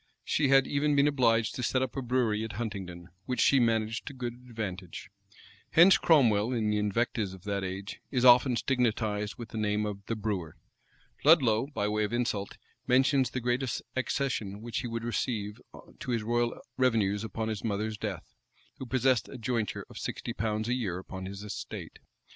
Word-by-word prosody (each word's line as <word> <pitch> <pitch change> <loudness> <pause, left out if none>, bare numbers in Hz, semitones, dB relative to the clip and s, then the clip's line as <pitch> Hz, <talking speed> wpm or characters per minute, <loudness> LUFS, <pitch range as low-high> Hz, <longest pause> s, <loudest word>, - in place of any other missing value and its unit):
She 150 - +1
had 135 0 +5
even 145 +1 +1
been 140 +1 +5
obliged 115 -5 +2
to - - -4
set 130 +2 +1
up 130 - -4
a 135 - -2
brewery 120 -4 +1
at 110 -1 -5
Huntingdon, 95 -5 -5 0.2
which 125 - -2
she 140 - +5
managed 115 -1 0
to 145 - -5
good 120 -2 -4
advantage. 110 -7 -7 0.6
Hence 175 +4 +7
Cromwell, 120 -8 +4
in 110 -3 0
the 105 - +1
invectives 105 -1 -1
of 95 - -16
that 100 -1 -2
age, 95 +2 -5
is 125 -2 +1
often 125 +1 +7
stigmatized 110 -5 0
with 120 -1 -8
the 110 - -5
name 105 0 0
of 100 -1 -5
the 115 - -1
brewer. 100 -7 -3 0.7
Ludlow, 130 -6 +5
by 105 -8 -2
way 105 0 0
of 105 - -2
insult, 115 -5 -2 0.3
mentions 130 0 +3
the 125 - -3
great 120 +2 +1 0.3
accession 125 -6 -2
which 120 -1 -3
he 125 - -4
would 115 0 -4
receive 115 -2 -2 0.4
to - - -7
his 115 -3 0
royal 120 +1 0 0.2
revenues 110 -6 +2
upon 110 +1 -3
his 110 -2 -4
mother's 110 0 -1
death, - - -5 0.5
who 130 - -6
possessed 130 -2 +2
a - - -8
jointure 115 -2 -2
of - - -10
sixty 120 - -4
pounds 110 -1 -2
a 120 - +1
year 105 -9 -2
upon 95 0 -7
his 100 +1 -7
estate. 105 - -7
115 Hz, 185 wpm, -29 LUFS, 105-125 Hz, 0.7 s, Hence